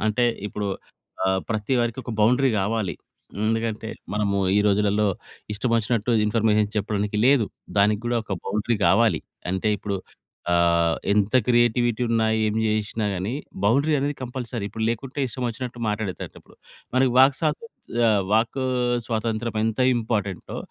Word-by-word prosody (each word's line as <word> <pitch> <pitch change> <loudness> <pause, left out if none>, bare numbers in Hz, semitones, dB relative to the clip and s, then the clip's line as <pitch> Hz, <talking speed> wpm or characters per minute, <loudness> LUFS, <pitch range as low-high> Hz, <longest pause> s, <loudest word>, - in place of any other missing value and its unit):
అంటే 110 +3 +2 0.2
ఇప్పుడు 105 0 -4 0.6
ఆహ్, 95 0 +2
ప్రతి 110 +3 0
వారికి 120 +1 -1
ఒక 120 - -5
బౌండరీ 125 +5 +4
కావాలి. 100 -3 -1 0.5
ఎందుకంటే, 110 0 -1 0.3
మనము 100 -1 0 0.2
ఈ - - +4
రోజులలో 105 +1 +2 0.5
ఇష్టమొచ్చినట్టు 115 0 0 0.2
ఇన్ఫర్మేషన్ 105 -1 +2
చెప్పడానికి 105 0 -2
లేదు. 130 -5 +4 0.3
దానికి 105 +1 +3
కూడా 120 0 +1
ఒక 100 - -3
బౌండరీ 105 +3 0
కావాలి. 110 -9 +3 0.3
అంటే, 95 +3 0
ఇప్పుడు 100 -1 -3 0.6
ఆహ్, 85 -1 +3 0.2
ఎంత 105 +1 +1
క్రియేటివిటీ 120 -1 +2
ఉన్నా, 115 -1 +2 0.2
ఏం 105 - -1
చేసినా 110 +1 -1
గాని, 95 +6 -3 0.3
బౌండరీ 140 +9 +3
అనేది 145 +2 -1
కంపల్సరీ. 125 -3 -5
ఇప్పుడు 110 +2 -4
లేకుంటే, 130 +4 -3
ఇష్టమొచ్చినట్టు 120 0 -4
మాటాడే‌తట్టిప్పుడు 105 -3 -5 0.4
మనకి 130 -1 +3
వాక్‌స‌త్ 145 - +3 0.3
చ - - -7
ఆ - - +5 0.2
వాకు 115 +4 +1 0.4
స్వాతంత్రం 110 0 -2
ఎంత 110 +2 -1 0.2
ఇంపార్టెం‌టో, 105 -5 -3
110 Hz, 130 wpm, -24 LUFS, 105-120 Hz, 0.6 s, ఆ